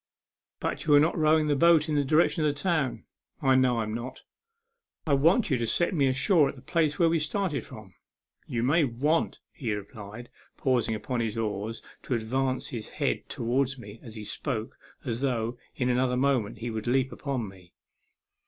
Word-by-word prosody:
"But - - -3
you 150 - +6
are - - +8
not 155 +3 +2
rowing 155 -1 +3
the 150 -1 +2
boat 165 +1 +5
in 155 - -1
the 145 -1 +2
direction 155 +3 +3
of 150 - +3
the 145 - -8
town." 155 -6 0 0.2
" - - -50
I 135 - +5
know 125 -3 +3
I'm 110 -1 -3
not." 120 +3 -6 0.8
"I 150 - +1
want 165 - +3
you 130 - +2
to 115 - -1
set 175 - +1
me 140 -5 +3
ashore 145 +3 +3
at - - -7
the 125 - -14
place 155 -4 +1
where 170 - +4
we 165 0 +2
started 155 0 -1
from." 105 -4 -12 0.5
u - - -6
Ye 115 - +1
may 155 +6 +4
want," 145 +6 0
he 120 -7 -4
replied, 105 +3 -9 0.3
pausing 120 -4 +1
upon 120 +3 -3
his 115 -2 -2
oars 110 0 -3 0.2
to 130 - -2
advance 130 +3 -1
his 115 -3 -6
head - - -1
towards 130 +3 0
me 105 -2 -11
as 115 -2 -10
he 110 - -7
spoke, 115 0 -4 0.3
as 115 0 -2
though, 120 -3 -1 0.2
in 125 - -1
another 125 0 +1
moment, 125 -5 +1
he 115 +2 -4
would 110 +1 -4
leap 130 +1 +2
upon 125 -2 -3
me. 90 -2 -15
130 Hz, 200 wpm, -28 LUFS, 115-150 Hz, 0.8 s, are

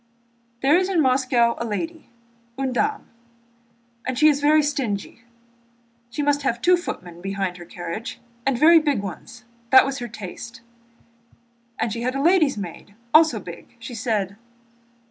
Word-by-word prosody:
"There 280 +4 +5
is 375 0 -1
in 370 -3 +1
Moscow 255 -4 +3
a - - -2
lady, 325 +9 -5 0.5
une 265 -1 -1
dame, 425 - -1 1.0
and 255 -1 -3
she 310 +1 +6
is 290 -1 +1
very 305 +1 +4
stingy. 245 -8 -3 0.9
She 290 +5 -3
must 290 0 +2
have 240 -4 -1
two 360 +8 +5
footmen 175 - -7
behind 195 -1 -3
her 175 - -10
carriage, 175 +6 -6 0.2
and 270 -1 +1
very 325 +5 +7
big 285 -9 0
ones. 215 +5 -8 0.3
That 265 +1 +8
was 275 0 -3
her 240 - -5
taste. 220 +2 -9 1.2
And 225 -2 -1
she 230 - -4
had 255 +2 -1
a - - -1
lady's 325 - +4
maid, 200 +1 -8 0.2
also 310 -8 +6
big. 170 -3 -11
She 235 +2 -9
said...." 210 -4 -2
250 Hz, 155 wpm, -23 LUFS, 210-290 Hz, 1.2 s, That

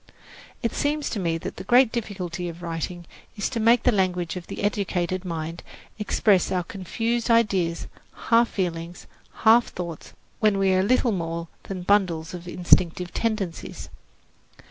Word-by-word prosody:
It 230 - 0
seems 295 0 -1
to 215 - -2
me 165 -3 0
that - - -7
the - - -6
great 240 +4 +5
difficulty 190 -6 -4
of 170 +1 -10
writing 170 +1 -4 0.3
is 205 - -1
to 235 - -3
make 230 +2 +4
the 250 - +5
language 180 -4 0
of 180 -2 -7
the - - -6
educated 185 -3 -1
mind 165 -1 -4 0.4
express 210 -2 +2
our 180 -1 0
confused 225 +7 -2
ideas, 195 -8 +2 0.5
half 230 0 +5
feelings, 175 -2 -4 0.4
half 230 +2 +7
thoughts, 170 -3 -7 0.3
when 215 -3 +3
we 195 -1 +3
are 185 - +3
little 240 +4 +2
more 170 -3 -3 0.2
than 185 -2 -5
bundles 175 -5 +1
of 175 0 -8
instinctive 175 0 +2
tendencies. 215 -7 -3
185 Hz, 150 wpm, -25 LUFS, 175-220 Hz, 0.5 s, half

